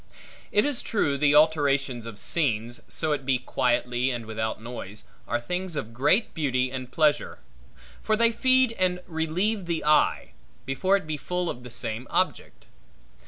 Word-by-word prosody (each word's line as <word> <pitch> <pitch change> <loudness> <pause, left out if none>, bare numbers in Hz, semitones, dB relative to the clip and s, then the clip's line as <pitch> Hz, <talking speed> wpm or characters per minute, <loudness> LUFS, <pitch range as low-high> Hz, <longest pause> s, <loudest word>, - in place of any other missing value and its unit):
It 210 - +3
is 285 -4 +1
true, 145 -10 0
the 145 +1 +3
alterations 140 -6 +3
of 115 -3 -8
scenes, 120 -5 0
so 155 -1 -1
it 145 -2 -1
be 130 -1 +2
quietly 125 0 0
and 120 -3 -4
without 110 0 -3
noise, 110 -3 -6 0.2
are - - 0
things 180 +7 -3
of 115 -5 -4
great 150 - +2
beauty 130 -4 0
and 130 -1 -6
pleasure; 155 -2 +1 0.6
for 215 - +1
they 230 0 +4
feed 255 +1 +3
and 180 -1 +1
relieve 175 +5 -1
the 165 -3 -2
eye, 150 - +3 0.3
before 185 +9 +2
it 195 - -8
be 155 -1 -3
full 180 +4 -2
of 120 - -9
the 125 - -10
same 115 +1 -3
object. 185 +2 -2
145 Hz, 165 wpm, -26 LUFS, 125-180 Hz, 0.6 s, they